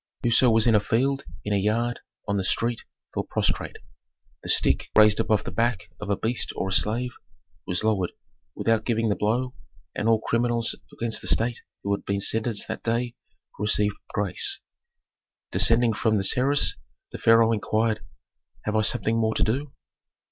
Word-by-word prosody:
Whoso 120 +2 +4
was 115 0 +4
in 115 - +4
a 105 - +5
field, 135 +6 0 0.2
in 105 - -1
a - - +2
yard, 115 +4 0 0.3
on 100 - 0
the 95 - -1
street, 115 +5 -1 0.3
fell - - -1
prostrate; - - -2 0.6
the - - -7
stick, - - +2
raised 105 -1 +6
above 105 -4 +1
the - - -6
back 95 -4 -1
of 105 - -7
a 100 - +1
beast 115 +1 -1
or 95 - -2
a - - -1
slave, 120 +5 +2 0.6
was 90 +3 0
lowered 100 -5 0 0.4
without 115 -1 +1
giving 115 -1 0
the 100 - +1
blow, 125 +5 -1 0.4
and 110 - -1
all 115 -1 +4
criminals 120 +1 0 0.2
against 115 -1 -3
the - - -5
state 115 +1 +1 0.2
who 100 - 0
had - - -10
been 100 0 -2
sentenced 110 +1 0
that - - -5
day 120 +1 -1 0.5
received 105 0 +2
grace. 100 -3 0 0.9
Descending 115 0 +5
from 110 0 +1
the 95 - -1
terrace 135 +8 +2 0.4
the - - -7
pharaoh 115 0 +5
inquired, 110 0 0 0.6
"Have 105 - -2
I 110 - +3
something 110 +1 +2
more 110 -1 0
to - - +1
do?" 135 +6 -1
110 Hz, 170 wpm, -25 LUFS, 105-120 Hz, 0.9 s, raised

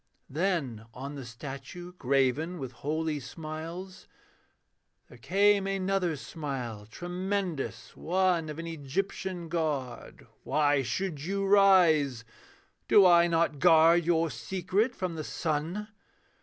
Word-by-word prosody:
Then 140 - -1
on 135 +3 -6
the 140 -2 -7
statue, 135 +8 -8
graven 140 +3 0
with 130 -5 -6
holy 155 +2 -2
smiles, 165 +7 -8 1.0
There 125 - -15
came 200 - +3
another 195 -3 0
smile 130 -9 -6
tremendous 180 - -4
one 180 -2 +1
Of 150 - -6
an 165 - -5
Egyptian 170 +3 -4
god. 150 -7 -3 0.2
'Why 145 0 +2
should 165 +1 -3
you 195 +3 -1
rise? 170 - +4 0.6
'Do 200 - +7
I 170 -1 +6
not 165 -3 +1
guard 165 +1 +6
your 165 -1 +1
secret 185 - -1
from 185 -2 -3
the 160 -1 -5
sun? 165 +8 -3
165 Hz, 115 wpm, -29 LUFS, 140-185 Hz, 1.0 s, Do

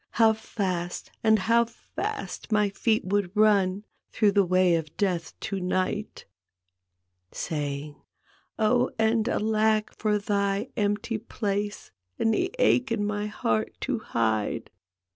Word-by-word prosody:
How 225 -1 +5
fast 185 -5 -3
and 220 -1 +5
how 230 +4 +3
fast 230 0 -6
my 210 -1 +3
feet 220 +2 0
would 195 -1 0
run 200 -2 +3 0.3
Through 210 -2 +3
the 200 0 +4
way 185 -1 +3
o' 165 - +1 0.2
Death 180 -5 -1
to 195 - -3
night!" 185 +3 -2 1.1
Saying, 145 -1 -4 0.3
" - - -36
Oh 245 +2 +3
and 220 0 +2
alack, 215 0 +1
for 210 -1 +1
thy 200 +2 0
empty 215 +1 -1
place 205 -2 -3 0.3
And 225 - +2
the 365 - 0
ache 255 - +3
in 210 -3 0
my 205 0 -2
heart 110 - -1
to - - -1
hide! 110 0 -1
205 Hz, 130 wpm, -27 LUFS, 185-220 Hz, 1.1 s, How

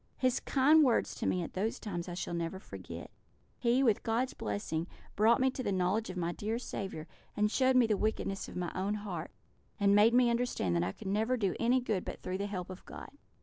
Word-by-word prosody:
His 255 -1 +2
kind 295 +3 +5
words 250 -4 +2
to - - -3
me 180 - +1
at - - -7
those 210 +4 -1
times 180 -4 -4
I 175 - -5
shall 175 - -4
never 170 +2 -2
forget; 190 - -9 0.5
he, 245 +2 +3
with 225 -6 +3
God's 235 +3 0
blessing, 160 - -3 0.3
brought 225 +3 +4
me 260 0 +3
to 260 - -5
the 205 - -1
knowledge 190 +4 0
of 185 - -6
my 170 -1 -1
dear 215 +5 -3
Saviour, 190 -9 -5 0.3
and 210 0 +2
showed 260 +1 +3
me 250 -2 +6
the 220 -2 +2
wickedness 195 -2 -1
of - - -10
my 180 -1 -2
own 195 +3 -1
heart, 190 -6 -5 0.5
and 200 -1 +4
made 215 +3 +6
me 245 -1 +5
understand 235 - 0
that 85 - +2
I 90 +2 -3
never 215 +6 +1
could 240 - -6
do 195 -3 +1
any 245 +2 +3
good 215 -7 -1
but - - -6
through 185 +1 -3
the 200 - -1
help 185 -2 -5
of 185 - -10
God." - - -9
210 Hz, 230 wpm, -32 LUFS, 180-235 Hz, 0.5 s, me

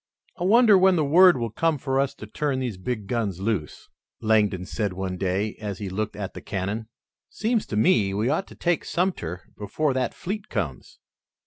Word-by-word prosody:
"I 175 - -1
wonder 215 -1 +6
when 190 0 +5
the 155 -3 +2
word 175 +3 +7
will 115 -2 -3
come 165 +6 +1
for 135 0 -1
us 140 0 0
to 110 - -9
turn 140 +5 -2
these 125 -6 -3
big 110 +1 -3
guns 100 -4 -2
loose?" 95 -7 -3 0.3
Langdon 105 -4 +2
said 100 -1 -2
one 95 0 -3
day, 95 +3 -1
as 100 -3 -4
he 100 -2 -5
looked 105 +2 -3
at 100 -1 -5
the - - -8
cannon. 105 +3 -3 0.4
"Seems 225 0 -1
to - - -4
me 110 - +3
we 105 +3 0
ought 155 +8 0
to - - -13
take 175 -1 0
Sumter 95 - -2
before 135 +8 -1
that 130 0 -1
fleet 200 +3 -5
comes." 85 - -4
110 Hz, 195 wpm, -25 LUFS, 100-155 Hz, 0.4 s, word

